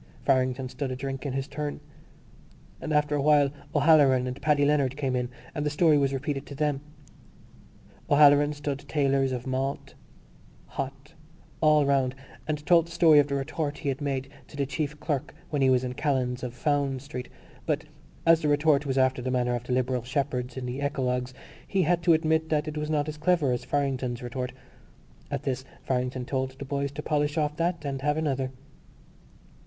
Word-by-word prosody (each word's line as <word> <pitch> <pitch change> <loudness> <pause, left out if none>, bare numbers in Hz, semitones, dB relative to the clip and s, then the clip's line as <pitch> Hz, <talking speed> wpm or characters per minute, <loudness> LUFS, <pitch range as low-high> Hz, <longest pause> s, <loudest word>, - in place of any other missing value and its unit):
Farrington 130 -1 +2
stood 135 +1 -4
a 130 - -3
drink 135 +1 -4
in 135 - -3
his 135 +1 -2
turn. 145 +1 -4 1.0
After 150 -1 +1
a 145 - +1
while 145 -1 +4 0.2
O'Halloran 140 -4 +5
and 125 +1 -5
Paddy 150 -2 +3
Leonard 140 -2 +2
came 135 -3 -1
in 125 -1 -1 0.2
and 150 - -2
the 150 - +1
story 155 +1 +4
was 140 -2 +2
repeated 140 +1 -3
to 140 - -8
them. 145 -1 0 1.3
O'Halloran 145 0 +6
stood 145 -1 -3
tailors 135 -2 +2
of 125 -1 -4
malt, 135 +1 -3 0.7
hot, 135 +3 -6 0.5
all 150 -2 +5
round 135 -2 +2 0.3
and 150 -1 -3
told 170 0 +5
the - - -13
story 165 -3 +6
of 145 - +3
the 140 - -2
retort 145 +1 -2
he 145 - -3
had 135 +2 -3
made 135 -2 -2 0.2
to - - -12
the 140 - +1
chief 145 +2 -3
clerk 145 -5 -3 0.2
when 145 -2 0
he 135 - +5
was 130 -1 +3
in 125 -1 -3
Callan's 130 -3 -1
of 125 -1 -5
Fownes's 140 -1 0
Street; 125 -3 -6 0.4
but, - - 0 0.4
as 165 0 +6
the 155 - 0
retort 145 0 +3
was 135 0 -1
after 130 -1 +2
the 130 - -2
manner 125 -1 +1
of 120 0 -3
the 125 - -2
liberal 125 0 0
shepherds 125 -1 -2
in 130 - -4
the 125 +2 -4
eclogues, 125 -3 -1 0.4
he 195 -2 +1
had 170 +2 +2
to 170 0 +5
admit 160 0 +1
that 155 0 +1
it 155 - -4
was 150 0 -3
not 150 -1 +1
as 150 -1 -5
clever 155 -4 +2
as 125 - -1
Farrington's 130 -4 -1
retort. 125 +1 -4 0.8
At - - -3
this 130 -1 -2 0.2
Farrington 125 -1 -1
told 130 0 -2
the 140 - -6
boys 140 0 -2
to 150 +1 -6
polish 150 0 0
off 150 -1 0
that 170 -2 -1
and 135 -1 -3
have 150 +2 +1
another. 135 -4 -1
140 Hz, 190 wpm, -27 LUFS, 130-150 Hz, 1.3 s, O'Halloran